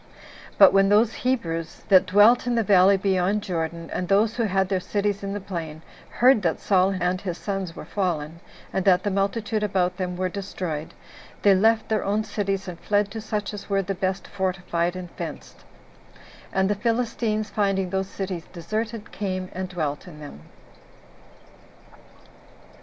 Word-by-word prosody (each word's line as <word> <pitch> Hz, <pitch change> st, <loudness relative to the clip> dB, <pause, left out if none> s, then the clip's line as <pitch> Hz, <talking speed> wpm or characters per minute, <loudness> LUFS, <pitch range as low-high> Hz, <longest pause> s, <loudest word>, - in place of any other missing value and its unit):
But 195 Hz, -2 st, +8 dB
when 195 Hz, 0 st, +4 dB
those 215 Hz, +3 st, +4 dB
Hebrews 165 Hz, -11 st, -2 dB
that 190 Hz, -1 st, +6 dB
dwelt 210 Hz, +6 st, +5 dB
in 245 Hz, -, +1 dB
the 230 Hz, -, +2 dB
valley 195 Hz, -1 st, +5 dB
beyond 195 Hz, +1 st, +1 dB
Jordan, 165 Hz, -2 st, -3 dB
and 180 Hz, -, -2 dB
those 210 Hz, +4 st, +3 dB
who 230 Hz, -, +1 dB
had 190 Hz, -1 st, +1 dB
their 190 Hz, -1 st, 0 dB
cities 205 Hz, +1 st, -1 dB
in 200 Hz, 0 st, -4 dB
the 205 Hz, -, -3 dB
plain, 165 Hz, -5 st, -6 dB, 0.3 s
heard 250 Hz, -2 st, +4 dB
that 170 Hz, -4 st, 0 dB
Saul 190 Hz, 0 st, +2 dB
and 180 Hz, +1 st, 0 dB
his 180 Hz, -3 st, -4 dB
sons 195 Hz, -4 st, -4 dB
were -, -, -8 dB
fallen, 170 Hz, -5 st, -2 dB, 0.3 s
and 190 Hz, -, 0 dB
that 185 Hz, -2 st, +4 dB
the 205 Hz, -, 0 dB
multitude 205 Hz, +2 st, -1 dB
about 185 Hz, -3 st, 0 dB
them 180 Hz, -2 st, -3 dB
were 185 Hz, 0 st, 0 dB
destroyed, 180 Hz, -5 st, -5 dB, 0.5 s
they 200 Hz, -, +7 dB
left 220 Hz, +3 st, +3 dB
their 220 Hz, -2 st, 0 dB
own 205 Hz, +2 st, 0 dB
cities, 195 Hz, -2 st, -2 dB
and 175 Hz, -2 st, -7 dB
fled 205 Hz, +1 st, +1 dB
to 220 Hz, +1 st, -5 dB
such 210 Hz, -1 st, -3 dB
as 205 Hz, 0 st, -8 dB
were 195 Hz, -1 st, +1 dB
the 195 Hz, +2 st, -2 dB
best 190 Hz, +1 st, -2 dB
fortified 180 Hz, -2 st, -1 dB
and 180 Hz, -2 st, -7 dB
fenced; -, -, -8 dB, 0.9 s
and 190 Hz, 0 st, +2 dB
the 205 Hz, -, +2 dB
Philistines, 220 Hz, -1 st, -1 dB
finding 195 Hz, -3 st, 0 dB
those 190 Hz, 0 st, -1 dB
cities 185 Hz, -5 st, -5 dB
deserted, 215 Hz, +5 st, -4 dB
came 185 Hz, -2 st, -4 dB
and 185 Hz, 0 st, -4 dB
dwelt 155 Hz, -2 st, -3 dB
in 155 Hz, -4 st, -11 dB
them. 145 Hz, -, -10 dB
195 Hz, 170 wpm, -24 LUFS, 180-205 Hz, 0.9 s, But